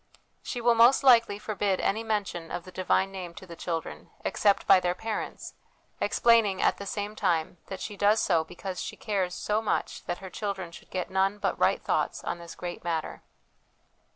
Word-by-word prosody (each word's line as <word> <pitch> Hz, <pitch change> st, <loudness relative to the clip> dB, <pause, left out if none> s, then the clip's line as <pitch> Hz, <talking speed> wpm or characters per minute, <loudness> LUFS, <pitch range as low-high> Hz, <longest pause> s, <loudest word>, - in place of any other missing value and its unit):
She 245 Hz, -, -4 dB
will 240 Hz, 0 st, +5 dB
most 235 Hz, +4 st, +6 dB
likely 230 Hz, -6 st, +6 dB
forbid 205 Hz, -2 st, -1 dB
any 220 Hz, +3 st, 0 dB
mention 200 Hz, -7 st, -2 dB
of 175 Hz, -, -4 dB
the 185 Hz, -, -12 dB
Divine 190 Hz, +1 st, +1 dB
Name 180 Hz, -3 st, -7 dB
to -, -, -10 dB
the 170 Hz, -2 st, -10 dB
children, 165 Hz, -1 st, -5 dB, 0.2 s
except 200 Hz, -2 st, +2 dB
by 185 Hz, -, +7 dB
their 180 Hz, 0 st, 0 dB
parents, 220 Hz, +2 st, -5 dB, 0.5 s
explaining 225 Hz, -5 st, +3 dB
at -, -, +2 dB
the 200 Hz, -, -7 dB
same 205 Hz, +1 st, -3 dB
time 165 Hz, -3 st, 0 dB
that 190 Hz, -, -6 dB
she 210 Hz, -, -5 dB
does 205 Hz, +2 st, +3 dB
so 165 Hz, -4 st, +2 dB
because 180 Hz, +3 st, -6 dB
she -, -, -5 dB
cares 190 Hz, -4 st, -1 dB
so 210 Hz, +1 st, 0 dB
much 220 Hz, -, -2 dB
that 175 Hz, -, -2 dB
her 190 Hz, -1 st, -9 dB
children 195 Hz, -4 st, -4 dB
should -, -, -13 dB
get 185 Hz, 0 st, -3 dB
none 195 Hz, +2 st, +2 dB
but -, -, -1 dB
right -, -, +2 dB
thoughts -, -, -1 dB
on 175 Hz, -, -3 dB
this 170 Hz, -1 st, -9 dB
great 175 Hz, -1 st, -6 dB
matter. 165 Hz, -2 st, -3 dB
195 Hz, 190 wpm, -28 LUFS, 180-210 Hz, 0.5 s, by